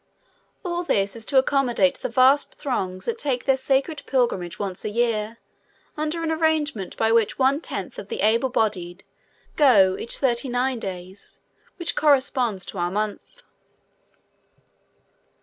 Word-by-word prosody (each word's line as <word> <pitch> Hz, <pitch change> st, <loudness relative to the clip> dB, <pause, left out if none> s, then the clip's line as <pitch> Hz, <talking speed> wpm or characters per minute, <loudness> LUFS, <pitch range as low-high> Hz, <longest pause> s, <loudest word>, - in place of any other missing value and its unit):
All 350 Hz, -1 st, -1 dB
this 200 Hz, -, 0 dB
is 225 Hz, -1 st, -8 dB
to 280 Hz, -, +2 dB
accommodate 260 Hz, -8 st, +2 dB
the -, -, -3 dB
vast 260 Hz, +4 st, +3 dB
throngs 185 Hz, -9 st, -3 dB
that 460 Hz, 0 st, -3 dB
take 260 Hz, -, -2 dB
their 270 Hz, -, +4 dB
sacred 270 Hz, +3 st, 0 dB
pilgrimage 235 Hz, -10 st, 0 dB
once 195 Hz, -3 st, -4 dB
in -, -, -2 dB
a -, -, -9 dB
year 230 Hz, -2 st, 0 dB, 0.6 s
under 310 Hz, +2 st, -2 dB
an 320 Hz, -, -1 dB
arrangement 315 Hz, -, -1 dB
by 225 Hz, 0 st, +2 dB
which 230 Hz, -2 st, +2 dB
one 275 Hz, +3 st, +2 dB
tenth -, -, -6 dB
of -, -, -8 dB
the 460 Hz, -, -4 dB
able 230 Hz, +4 st, +2 dB
bodied 195 Hz, -6 st, -2 dB, 0.5 s
go 205 Hz, -11 st, +5 dB
each 235 Hz, -, -3 dB
thirty 255 Hz, 0 st, 0 dB
nine 250 Hz, 0 st, 0 dB
days, 185 Hz, -1 st, -8 dB, 0.4 s
which 345 Hz, -3 st, -2 dB
corresponds 260 Hz, -8 st, +2 dB
to 190 Hz, -, -7 dB
our 175 Hz, 0 st, 0 dB
month. 210 Hz, -, -4 dB
245 Hz, 150 wpm, -23 LUFS, 205-280 Hz, 0.6 s, go